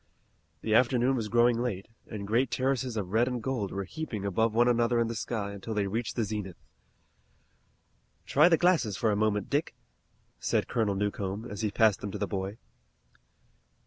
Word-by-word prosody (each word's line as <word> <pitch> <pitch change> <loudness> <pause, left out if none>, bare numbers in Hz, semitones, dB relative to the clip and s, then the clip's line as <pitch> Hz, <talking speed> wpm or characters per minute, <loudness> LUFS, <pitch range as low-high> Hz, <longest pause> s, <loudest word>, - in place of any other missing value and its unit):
The 110 - 0
afternoon 125 +2 +3
was 115 -4 -2
growing 120 +1 +3
late, 100 -6 -3 0.2
and 105 -2 -6
great 115 +5 +1
terraces 130 -2 -1
of 95 -3 -3
red 115 +3 +3
and 125 -1 -2
gold 115 -4 -2
were 100 - -3
heaping 110 - -5
above 110 +4 +1
one 120 +1 +4
another 120 0 +2
in 115 - +3
the - - -2
sky 105 -2 -3
until 100 +2 -6
they 105 -1 +1
reached 110 +4 -3
the 115 - +1
zenith. 105 -4 -4 1.7
"Try 150 +5 +5
the 165 - +5
glasses 160 - +2
for 110 - +1
a - - +1
moment, 105 -1 0
Dick," 145 +3 0 0.6
said - - 0
Colonel 110 -5 0
Newcomb, 100 +1 -2
as 105 -3 -6
he 110 - +1
passed 105 -1 +3
them 105 - -4
to 105 - -5
the 105 - -1
boy. 95 +1 -4
110 Hz, 180 wpm, -29 LUFS, 100-120 Hz, 1.7 s, Try